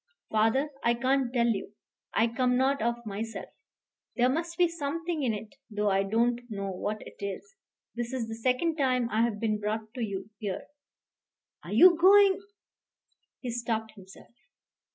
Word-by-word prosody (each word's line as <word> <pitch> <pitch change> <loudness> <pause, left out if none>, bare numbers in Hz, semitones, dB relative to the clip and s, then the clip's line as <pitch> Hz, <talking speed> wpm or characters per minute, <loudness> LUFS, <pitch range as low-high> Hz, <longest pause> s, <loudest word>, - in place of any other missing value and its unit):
"Father, 225 +7 +2
I 235 0 +3
can't 260 +1 +1
tell 240 -2 +2
you. 205 -2 -2 0.4
I 225 - +3
come 250 +1 +1
not 270 0 +2
of 235 +1 -1
myself. 220 +2 -5 0.7
There 245 +1 +3
must 335 +4 -2
be 355 - +5
something 335 +1 -3
in 255 -4 +1
it, 215 +2 -6 0.2
though 210 -1 0
I 195 0 +3
don't 235 +4 +1
know 200 -2 -4
what 210 +3 -4
it - - -13
is. 200 - -6 0.4
This 240 0 -4
is 250 -4 -2
the 225 - -5
second 255 +8 0
time 255 -4 +1
I 220 - +2
have 230 -3 0
been 215 -1 0
brought 215 +1 -3
to 255 - -5
you 200 0 -5
here." 200 -4 -3 1.0
"Are - - -9
you 360 -1 +8
going 390 +1 +6 0.5
?" - - -49
He 245 - -3
stopped 230 -2 -2
himself. 195 +3 -15
235 Hz, 170 wpm, -29 LUFS, 215-270 Hz, 1.0 s, you